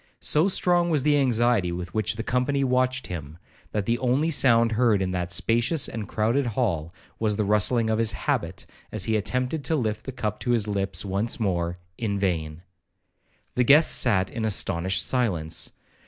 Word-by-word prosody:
So 155 +5 +2
strong 175 -2 +2
was 150 -5 +1
the 150 0 +3
anxiety 120 -7 +2
with 85 +1 -6
which 110 0 0
the 115 - -4
company 130 +3 0
watched 130 0 0
him, 80 -3 -7 0.3
that 105 -2 -2
the 120 +3 0
only 135 +6 +1
sound 115 -5 +4
heard 115 -2 +2
in 95 -1 -2
that 90 -1 -3
spacious 120 - +2
and 110 -3 -6
crowded 120 +5 0
hall, 100 -9 -1 0.3
was 110 -2 0
the 105 0 -1
rustling 105 +3 +2
of 110 0 0
his 115 -1 +2
habit, - - -3 0.3
as - - -1
he 110 - 0
attempted 125 +7 -1
to 160 - +1
lift 110 -5 -3
the - - -3
cup 105 -5 -4
to - - -4
his 115 -4 +1
lips 100 -3 -2
once 100 +5 -1
more—in 90 +1 -3
vain. 85 -4 -2 0.9
The 125 - +2
guests 145 +6 +5
sat 95 -6 +1
in 115 - -4
astonished 95 -4 +1
silence. 85 -11 0
110 Hz, 175 wpm, -25 LUFS, 95-125 Hz, 0.9 s, guests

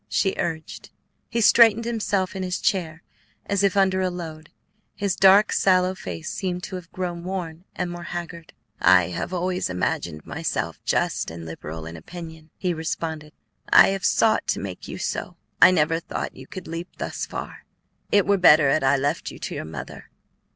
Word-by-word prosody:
she 195 - +1
urged. 160 -2 -4 0.4
He 235 0 0
straightened 230 0 +6
himself 205 -5 -1
in 190 - -3
his 185 0 -2
chair 165 -4 -1 0.4
as 200 -1 0
if 200 0 +2
under 190 -1 +3
a 185 - +1
load. 160 -3 -7 0.5
His 200 -3 -1
dark, 195 +2 +6
sallow 185 -1 +3
face 85 - -7
seemed 180 -1 -3
to 190 - -6
have 175 -2 -12
grown 175 -2 -4
worn 180 -2 -5
and 180 -1 -2
more 175 0 -7
haggard. 170 -1 -7 0.3
"I 90 -2 +5
have 90 - -4
always 180 - -1
imagined 85 -3 -2
myself - - -3
just - - 0
and 85 0 -8
liberal 80 0 -7
in 80 +1 -8
opinion," 160 - -10
he 180 -2 -1
responded; 160 -1 -4 0.4
"I - - +8
have 195 -1 -2
sought 220 -1 +3
to - - 0
make - - -7
you - - -6
so. - - -4 0.2
I - - +10
never 165 -2 +2
thought - - -5
you 130 0 -12
could 185 - -8
leap 165 +2 -5
thus - - -4
far. - - -7 0.5
It 205 -2 +4
were 200 0 +3
better 155 -6 +6
had 155 - +2
I 135 +1 +4
left 145 +4 -1
you - - -10
to - - -5
your - - -5
mother. 80 -1 -9
175 Hz, 180 wpm, -24 LUFS, 155-190 Hz, 0.5 s, I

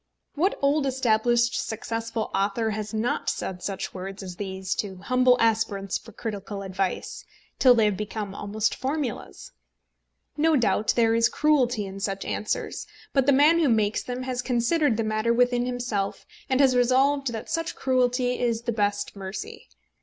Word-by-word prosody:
What 360 +7 +1
old 280 0 +2
established 240 -2 +2
successful 225 0 -4
author 205 +3 0
has 215 0 -4
not 220 +2 -1
said 180 -1 -4
such 195 0 -4
words 195 +1 -7
as 180 -2 -8
these 190 -1 -3
to 195 -2 -3
humble 250 +5 +3
aspirants 215 -4 +1
for - - -14
critical 205 -2 -5
advice, 190 -1 -3 0.4
till 250 -2 +7
they 225 -2 +4
have 205 -3 +1
become 210 -1 -4
almost 205 +2 -1
formulas? 270 -3 -4 0.8
No 315 +2 +3
doubt 215 -4 +2
there 230 -1 +3
is 230 +1 +3
cruelty 255 -8 +2
in 195 0 -8
such 195 0 -3
answers; 210 - -3 0.3
but 270 -1 +2
the - - +6
man 295 +5 +5
who 310 -5 +3
makes 215 -2 +2
them 250 +1 -5
has 255 -1 -2
considered 245 +1 +1
the 225 - 0
matter 215 +1 0
within 245 0 +2
himself, 240 -6 -3 0.2
and 260 0 +2
has 265 -2 +4
resolved 265 +2 +3
that 225 -2 -6
such 330 -1 -2
cruelty 250 -1 +1
is 235 -2 0
the 235 - -1
best 205 -2 -1
mercy. 190 0 -7
230 Hz, 160 wpm, -25 LUFS, 205-255 Hz, 0.8 s, till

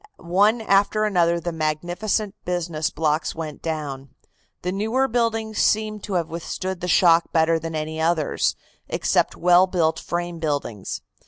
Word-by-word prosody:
One 200 +6 +2
after 210 +1 +2
another 175 -5 +2
of 170 - -5
the 175 - -2
magnificent 175 +7 -1
business 170 -3 -2
blocks 155 0 -1
went 155 -3 -6
down. 145 -4 -4 0.5
The 180 - -1
newer 220 +7 +1
buildings 225 -3 -1
seemed 215 -1 +1
to 205 - -5
have 170 -3 0
withstood 175 +2 -5
the 180 - -3
shock 170 -1 +4
better 165 0 +3
than 165 0 -5
any 155 +1 -3
others, 160 -2 +1 0.3
except - - +1
well 180 +2 +5
built 165 -3 +1
frame 175 -1 -4
buildings. 145 - -3
175 Hz, 150 wpm, -23 LUFS, 160-200 Hz, 0.5 s, well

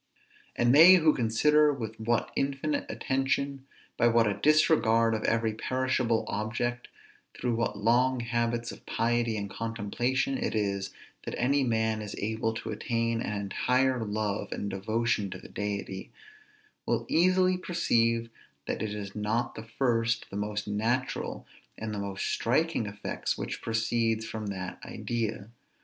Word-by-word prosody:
And 120 +1 +3
they 165 +6 +10
who 160 -4 +5
consider 150 +6 +3
with 110 -5 -5
what 115 +1 0
infinite 140 +2 -1
attention, 135 +1 -1 0.3
by 120 - +4
what 115 -1 +4
a 105 - +1
disregard 115 -6 +4
of 110 - -2
every 115 -1 +1
perishable 125 0 0
object, 120 +3 -2 0.5
through 125 -1 -1
what 115 -2 -1
long 120 +4 +2
habits 115 0 -1
of - - -12
piety 115 0 +1
and 100 -1 -3
contemplation 115 - -1
it 240 - -2
is 100 -2 -1 0.3
that - - -4
any 140 +3 +2
man 110 -2 0
is 105 -1 -6
able 110 +1 -1
to 110 0 -5
attain 115 +1 -1
an 105 -2 -2
entire 125 +5 +1
love 105 -1 -2
and 100 - -3
devotion 110 +1 0
to - - -6
the - - -13
Deity, 100 -2 -4 0.8
will - - 0
easily 185 +2 +3
perceive 115 -10 +1 0.3
that - - -3
it 105 -1 -2
is 100 -1 -6
not 110 +3 -1
the 110 0 -9
first, 120 -3 +1
the - - -7
most 105 0 -3
natural, 115 +5 -1 0.3
and 110 -1 -4
the 105 - -3
most 100 -1 -3
striking 130 -1 +1
effect 100 0 -3
which - - -5
proceeds 115 0 0
from 110 -2 -5
that 95 -2 -5
idea. 115 -2 -3
115 Hz, 145 wpm, -29 LUFS, 110-130 Hz, 0.8 s, they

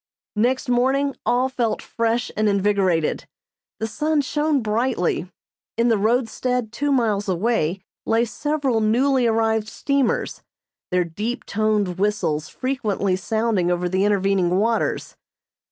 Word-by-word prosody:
Next 255 +5 +1
morning 265 +3 +1
all 245 +2 +3
felt 245 -4 -1
fresh 230 +1 -1
and 215 0 +2
invigorated. 195 -5 +1 0.5
The 220 - -1
sun 300 +7 0
shone 295 -1 0
brightly. 215 -5 0 0.5
In 235 +1 +3
the 225 - +3
roadstead 240 +1 0
two 285 +5 -1
miles 215 -6 +1
away 185 -2 0 0.3
lay 230 +1 +3
several 275 -1 -1
newly 250 +3 +2
arrived 220 -1 +1
steamers, 275 +1 -1 0.5
their 180 0 +2
deep 215 +9 -4
toned 210 -4 0
whistles 195 -7 0
frequently 215 -8 -1
sounding 215 -2 0
over 180 0 0
the 190 +2 +1
intervening 195 -3 +2
waters. 225 +3 0
225 Hz, 120 wpm, -22 LUFS, 200-250 Hz, 0.5 s, all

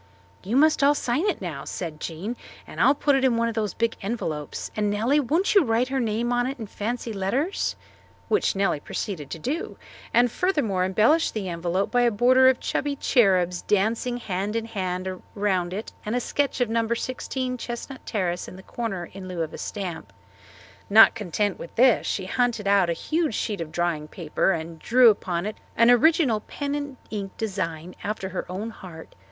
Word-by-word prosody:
"You 210 +6 -3
must 310 +2 +4
all 285 +1 +5
sign 285 +9 0
it 390 - -1
now," 155 -6 -5
said 160 -3 -5
Jean, 180 +10 -4 0.3
"and - - -5
I'll 280 - +5
put 285 0 +2
it 270 - +1
in 250 -3 +3
one 230 0 +2
of 230 - -2
those 215 -4 -2
big 230 0 0
envelopes; 165 -9 -4
and, 210 -1 +1
Nellie, 230 +8 +2
won't 320 - +1
you 400 -4 +6
write 235 0 +1
her 270 0 0
name 235 +1 0
on 245 +1 +1
it 270 - -4
in 225 - -6
fancy 230 +3 -4
letters?" 250 - -1 0.5
Which 425 - +1
Nellie 195 -6 +1
proceeded 150 -1 -5
to - - -5
do, 290 - -4 0.3
and 240 0 +4
furthermore 235 - +1
embellished 220 - +3
the 205 -3 -2
envelope 175 +3 -1
by 245 - +3
a 240 - +4
border 255 +4 +5
of 260 - +1
chubby 285 0 -1
cherubs, 185 -10 +2
dancing 225 +4 0
hand 200 -1 -3
in 230 -1 -1
hand 185 -3 -3 0.2
around 190 -4 0
it 205 +4 -5
and 215 +3 -2
a - - +2
sketch 280 +2 -1
of 245 - +3
No. 230 0 +1
16 255 +1 -2
Chestnut 240 +3 -6
Terrace 180 -5 -2
in - - -9
the 190 - -12
corner 195 -7 -4
in 190 -1 -8
lieu 175 -3 -2
of 160 - -6
a - - -7
stamp. 180 - -5 0.8
Not 220 +2 +8
content 205 -1 -2
with 170 - -9
this 250 0 +4
she 190 - -2
hunted 230 0 0
out 200 -3 +4
a - - +2
huge 310 - -1
sheet 205 -6 -2
of 160 -2 -5
drawing 170 -3 -1
paper 170 +3 0
and 165 -1 -4
drew 240 +5 +6
upon 180 -3 -3
it 215 +1 -4 0.2
an 230 +1 +6
original 255 -2 +4
pen 285 +6 -5
and 285 -2 -4
ink 200 -3 -5
design 180 -5 -3
after 200 -2 -3
her 185 -1 -5
own 210 +5 -4
heart. 175 -6 -11
215 Hz, 195 wpm, -25 LUFS, 185-245 Hz, 0.8 s, Not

